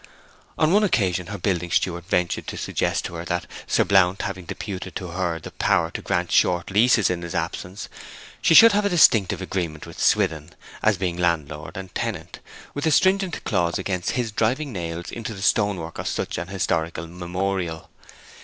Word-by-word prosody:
On 155 0 +3
one 210 +1 +5
occasion 90 - +1
her 100 +1 -5
building 90 -2 -1
steward 85 0 0
ventured 90 -4 0
to - - -5
suggest - - -1
to - - -6
her 85 0 -6
that, 90 0 -2 0.2
Sir - - +3
Blount 95 -1 +3
having 95 -2 -5
deputed 95 +2 -6
to 90 -3 -5
her 85 -1 -2
the - - -9
power - - +1
to - - -5
grant 90 0 -1
short 90 +1 +2
leases 110 0 +4
in 90 -1 -3
his 85 +1 -6
absence, 90 +3 -4 0.5
she 165 - +4
should 230 +5 +10
have 205 +1 +2
a 200 - +2
distinctive 115 - +4
agreement 85 -5 -3
with - - -11
Swithin, 80 -1 +1 0.3
as 110 -3 +3
between 90 -2 -2
landlord 75 -3 -1
and 95 -1 -8
tenant, - - -4 0.3
with 145 +2 -2
a - - +3
stringent 190 +1 +2
clause 85 -4 0
against 90 -3 -2
his 120 -3 -1
driving 125 +6 0
nails 85 -2 -5
into 115 -1 -6
the 95 - -9
stonework 100 -7 0
of - - -4
such - - -2
an 85 - -5
historical 85 -4 -2
memorial. 90 0 -3
90 Hz, 180 wpm, -23 LUFS, 85-105 Hz, 0.5 s, should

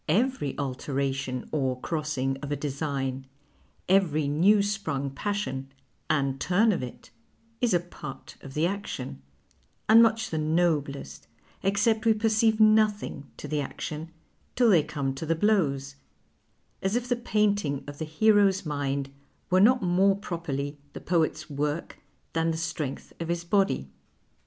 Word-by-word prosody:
" - - -12 0.2
Every 255 - -4
alteration 135 -1 -2
or 130 -4 0
crossing 150 -4 -2
of 145 -1 -5
a - - +1
design, 135 -2 -3 0.6
every 165 -6 +3
new 190 +8 +4
sprung 160 -10 -2
passion, 135 -6 -3 0.4
and 135 -3 +1
turn 205 - +3
of 185 - -1
it, 125 -1 -9 0.5
is 245 -2 +2
a 175 - +4
part 155 -5 -9
of 135 0 -10
the 155 +2 +2
action, 155 - -4 0.7
and 225 +1 +8
nuich 225 -1 +2
the 160 - -1
noblest, 150 - -1 0.4
excej)t 210 +3 +2
we 225 -1 +4
perceive 220 0 +2
nothing 215 -8 +3
to - - -7
be 150 -1 -1
action, 155 +3 -5 0.5
till 240 -3 +5
they 170 -5 +6
come 140 -2 -3
to 160 +4 -1
blows; 140 -9 +1 0.8
as 190 +3 0
if 245 0 -1
the 245 - +2
painting 205 - 0
of 145 0 -9
the 160 - -2
hero's 200 +3 +3
mind 140 -2 -2 0.4
were 185 +1 +5
not 245 +2 +5
more 190 +2 +3
proi)erly 150 -7 -4 0.2
the - - -6
poet's 160 -2 0
work 150 +2 -3 0.3
than 165 0 +1
the 160 - -1
strength 160 -4 -4
of 165 - -3
his 170 0 -2
body." 190 - +1
160 Hz, 145 wpm, -27 LUFS, 140-200 Hz, 0.8 s, and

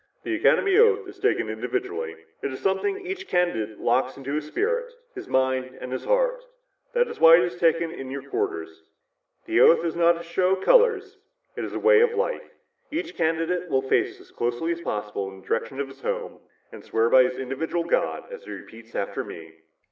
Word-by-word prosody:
"The 360 - -2
Academy 380 +4 +3
oath 450 -3 +4
is - - -12
taken - - +1
individually. 400 +4 -3 0.3
"It - - -3
is 130 - -6
something 380 - -1
each 380 +1 -5
candidate 110 -13 0
locks 130 +2 +1
in 135 - -10
his 145 +3 -3
spirit, 485 - -1 0.2
his 380 - -8
mind 130 0 0
and 125 - -7
his 130 - -4
heart. - - +1 0.5
That 485 0 +2
is - - -8
why 165 0 +9
it 175 - +4
is 175 0 -3
taken 165 0 +2
in 135 -5 -7
your 135 0 -5
quarters. 80 -10 -3 0.6
The - - +2
oath 170 - +6
is 165 - -2
not 170 0 +3
a - - -8
show 185 +2 +1
of 190 - -9
color, 480 -2 +6
it 430 +5 -12
is - - -5
a - - -2
way 465 0 +6
of 475 0 +3
life. - - -2 0.4
Each 335 +3 -4
candidate 165 +2 -1
will 135 -2 +1
face 135 - 0
as - - -18
closely 120 +8 -2
as 170 0 -3
possible 105 -7 -3
in 95 0 -12
the - - -22
direction 135 - -2
of 140 - -2
his 135 0 -15
home - - -4 0.3
and - - -11
swear 115 +1 +1
by 130 +2 +7
his 125 0 +1
own - - -5
individual 150 +6 -2
God 170 - 0
as 480 0 -9
he - - -11
repeats 115 0 -11
after 100 - -2
me." 80 -1 -10
170 Hz, 210 wpm, -25 LUFS, -, 0.6 s, why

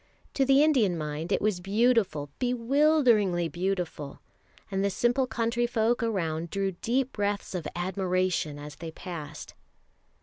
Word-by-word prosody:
To 270 - +2
the 275 +2 +5
Indian 235 - +3
mind 155 +1 -4
it - - +1
was 210 -4 +1
beautiful, 195 - +1
bewilderingly 245 - +3
beautiful; 175 -4 -3 0.5
and 195 0 0
the 200 - +2
simple 245 +6 +1
country 235 +1 0
folk 235 0 +1
around 170 -7 -1
drew 195 +2 -1
deep 245 +8 -1
breaths 205 -1 -2
of 170 -5 -3
admiration 185 -4 -1
as 145 0 -9
they 165 - -6
passed. 160 -3 -8
195 Hz, 135 wpm, -28 LUFS, 170-240 Hz, 0.5 s, the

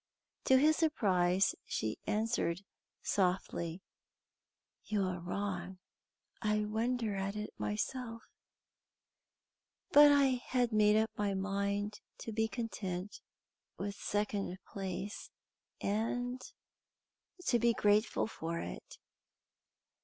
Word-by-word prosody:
To 265 - +6
his 310 +3 +5
surprise, 195 - +3
she 110 0 -2
answered 210 -5 0 0.4
softly: 180 -2 0 1.0
"You 210 -2 0
are 185 -1 -2
wrong. 185 0 -3 0.6
I 210 -1 +1
wonder 225 +1 0
at 195 +1 -2
it 210 0 -4
myself, 230 - -3 1.7
but 290 0 +9
I 270 -3 +4
had 245 -2 +2
made 210 0 +5
up 220 0 +2
my 205 -1 0
mind 200 +2 -1 0.2
to 225 - -5
be 220 +1 +1
content 205 -5 -4 0.6
with 200 +1 -3
second 205 -2 -2
place, 195 +1 -5 0.5
and 245 +4 -1 1.0
to 240 - +3
be 235 +1 +4
grateful 210 +1 +3
for 170 -6 -4
it." - - -7
210 Hz, 100 wpm, -34 LUFS, 190-230 Hz, 1.7 s, but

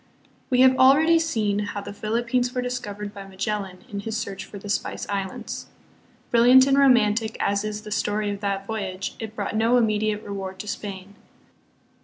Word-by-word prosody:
We 250 0 +3
have 260 0 +6
already 310 +6 +6
seen 215 -11 0
how 205 0 -3
the 200 - -8
Philippines 240 +4 -1
were 250 - 0
discovered 210 -5 -5
by 195 -1 -9
Magellan 195 -1 -4
in 200 - -5
his 220 +2 -3
search 200 -3 -5
for 205 - -10
the 200 - -9
Spice 200 - -2
Islands. 195 -2 -4 0.6
Brilliant 245 +2 +7
and 275 0 +3
romantic 230 -5 +3
as 200 0 +1
is 215 0 -4
the 210 - -9
story 210 0 0
of 200 - -5
that 195 -1 -2
voyage, 195 -3 -4
it 220 -1 -7
brought 205 -1 -3
no 230 +3 +3
immediate 215 -2 +1
reward 195 -2 -6
to 210 - -11
Spain. 200 -1 -6
210 Hz, 175 wpm, -24 LUFS, 200-240 Hz, 0.6 s, Brilliant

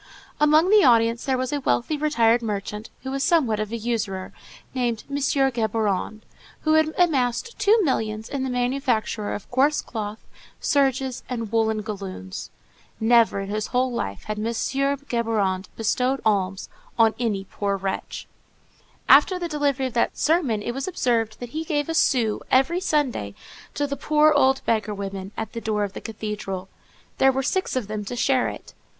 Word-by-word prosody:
Among 305 +5 +4
the 420 -2 +7
audience 230 -1 +4
there 265 -2 +1
was 255 +2 -2
a 290 - 0
wealthy 270 +2 0
retired 240 -6 +2
merchant, 210 0 -4
who 265 - -4
was 275 0 -2
somewhat 270 -9 +2
of 215 0 -3
a 230 - -2
usurer, 215 -5 -3 0.4
named 240 -4 -1
M. 280 - -1
Géborand, 225 -7 0 0.4
who 310 - +2
had 315 0 +4
amassed 310 - +1
two 420 +2 +5
millions 220 -7 -1
in 275 -2 -3
the 265 - -2
manufacture 245 -4 -1
of 205 - -5
coarse 275 +4 +3
cloth, 215 -2 -5 0.4
serges, 270 -3 +1
and 230 -4 -4
woollen 220 -1 +1
galloons. 195 - -6 0.5
Never 225 -3 +4
in 195 - -6
his 215 0 -2
whole 255 +1 +1
life 100 - -4
had 215 0 -4
M. 215 - -2
Géborand 235 -6 -1
bestowed 250 +4 0
alms 195 -3 0 0.3
on 225 -1 +5
any 210 -5 -1
poor 200 0 -2
wretch. 190 0 -4 0.8
After 370 - +6
the 350 -1 -3
delivery 285 -4 0
of 255 - -4
that 235 - 0
sermon, 290 -10 +1
it 240 - -2
was 270 +2 -4
observed 230 -10 0
that 245 - -6
he 315 +6 -4
gave 295 -2 -1
a 325 - -2
sou 235 -8 +2
every 270 +7 +3
Sunday 265 - -1 0.4
to 290 - 0
the 280 0 -3
poor 305 +2 +3
old 270 -2 +3
beggar 215 -2 0
women 195 -1 -5
at 220 - -4
the 230 - -5
door 210 -2 0
of 200 -1 -4
the - - -7
cathedral. 210 -4 -5 0.5
There 270 - +6
were 265 +1 -1
six 375 +4 -1
of 255 -4 -1
them 210 0 -4
to 245 - -5
share 255 +1 +2
it. - - -8
240 Hz, 170 wpm, -24 LUFS, 215-275 Hz, 0.8 s, the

